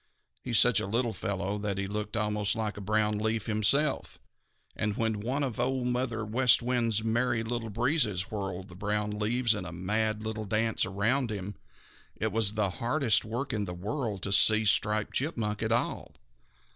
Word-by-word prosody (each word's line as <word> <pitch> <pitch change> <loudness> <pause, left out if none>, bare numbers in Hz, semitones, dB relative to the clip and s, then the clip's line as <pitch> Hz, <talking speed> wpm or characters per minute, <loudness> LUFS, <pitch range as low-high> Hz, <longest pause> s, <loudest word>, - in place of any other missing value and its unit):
He - - -8
is 115 - +4
such 120 -3 +5
a - - -3
little 115 +2 0
fellow 100 0 -3
that 100 -2 -2
he 100 - -1
looked 105 +1 -4
almost 105 +1 0
like 110 -2 -2
a 105 - -7
brown 105 +1 +1
leaf 110 0 -1
himself, 115 +7 +1 0.6
and 105 -1 -2
when 110 -2 0
one 130 +7 -1
of 125 -5 -3
Old 130 +1 0
Mother 125 -3 -1
West 120 +3 +4
Wind's 115 -3 +1
Merry 120 +1 +1
Little 115 0 -3
Breezes 110 - 0
whirled 95 -2 -4
the 90 - -12
brown 105 +2 -2
leaves 115 +2 +2
in 100 - -4
a 90 - -7
mad 105 +4 -1
little 110 0 -4
dance 110 0 +1
around 115 +7 0
him, 100 -1 -4 0.6
it 110 +1 -2
was 105 -1 +1
the 105 -3 0
hardest 120 -1 +2
work 120 +5 -4
in 105 -2 -1
the 90 -1 -6
world 105 +1 -4
to 100 - -2
see 110 +2 +6
Striped 105 +1 +2
Chipmunk 115 -8 -1
at 110 0 -1
all. 120 - -1
110 Hz, 185 wpm, -29 LUFS, 105-120 Hz, 0.6 s, see